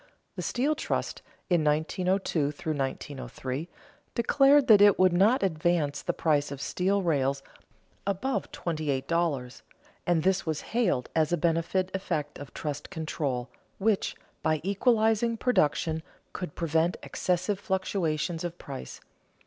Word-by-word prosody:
The - - -4
steel 275 +5 +1
trust, 305 - -3 0.3
in 175 -4 +2
1902 160 0 +1 0.8
3, 130 +8 -5 0.5
declared 275 +4 +5
that 210 -4 +7
it 205 -1 +7
would 185 -1 +4
not 200 +7 +4
advance 160 -4 +1
the - - -1
price 145 -3 +1
of 140 - -6
steel 195 +6 0
rails 140 -4 +1 0.6
above 200 +7 -1
twenty 155 -3 -3
eight 135 -1 -1
dollars, 150 -7 -1 0.5
and 170 -3 +2
this 190 +1 +2
was 155 -2 -2
hailed 195 - +1
as 160 -1 +2
a 175 - +2
beneficent 170 +3 0
effect 160 -6 -3
of 145 -2 -9
trust 145 -1 -5
control, 150 -7 -3 0.3
which, 205 0 +1 0.3
by 155 -1 +1
equalizing 220 +3 +2
production, 160 - +1 0.3
could 180 -5 -5
prevent 165 +1 +1
excessive 185 +2 -1
fluctuations 175 -4 -1
of 175 0 -4
price. 65 0 -8
175 Hz, 130 wpm, -28 LUFS, 150-195 Hz, 0.8 s, that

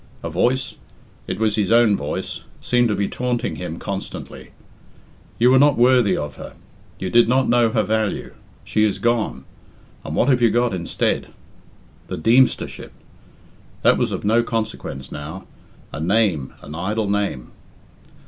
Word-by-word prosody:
A 85 - -4
voice 130 +10 0 0.5
it - - -3
was 110 -1 0
his 105 -1 0
own 115 -3 +5
voice 70 -4 -4 0.2
seemed 120 -1 +2
to 105 - 0
be 100 0 0
taunting 125 -1 -2
him 85 -2 -5
constantly: 100 +1 -7 0.9
"You 120 +2 +4
were 130 - +6
not 145 0 +4
worthy 120 -5 +4
of 75 -2 -5
her. - - -10 0.4
You 95 -1 -4
did 120 -1 +5
not 130 +1 +3
know 120 -1 +3
her - - +1
value. 110 -1 -1 0.3
She 110 - +1
is 105 -2 +1
gone; 120 -2 -1 0.6
and - - -5
what - - +2
have 125 -3 +3
you 120 - +5
got 120 0 +1
instead!" 85 -2 -1 0.8
The - - -5
Deemstership! 120 +10 +2 0.9
That - - +4
was - - 0
of - - -4
no 115 +3 +4
consequence 110 - -4
now. 80 +6 -7 0.5
A - - -5
name, 90 -5 +1
an 75 - -9
idle 105 +6 -2
name! 100 -11 -2
110 Hz, 155 wpm, -21 LUFS, 95-120 Hz, 0.9 s, were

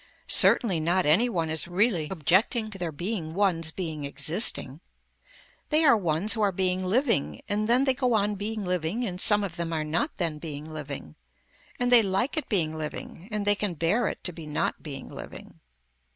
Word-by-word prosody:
Certainly 195 -10 +5
not 175 +4 +1
any 185 +12 +4
one 165 -7 -2
is 160 +1 -1
really 180 -3 0
objecting 195 - +1
to 195 - -8
their 175 -2 -3
being 170 0 -4
ones 180 -5 +1
being 160 -4 -5
existing. 145 - +1 0.9
They 310 +1 +4
are 275 - +6
ones 180 +1 +1
who 220 - -3
are 205 -2 +2
being 185 0 -1
living 185 - 0
and 210 +1 -1
then 250 +3 +4
they 265 -1 +2
go 250 -2 0
on 210 0 +1
being 210 +1 -4
living 180 +6 -2
and 180 -3 -3
some 210 -1 +4
of 185 -3 -6
them 170 -1 -3
are 160 -1 -2
not 170 - -2
then 165 -5 -2
being 150 -2 -7
living, 145 - -8 0.6
and 245 0 0
they 245 -2 +9
like 195 +6 -1
it 310 - -3
being 160 -7 +1
living 160 +3 -7
and 210 -1 -2
they 205 - +6
can 205 -3 -2
bear 185 +9 +1
it - - -6
to 180 - -3
be 160 -2 -10
not 150 - -2
being 140 -3 -8
living. - - -11
180 Hz, 195 wpm, -26 LUFS, 160-215 Hz, 0.9 s, they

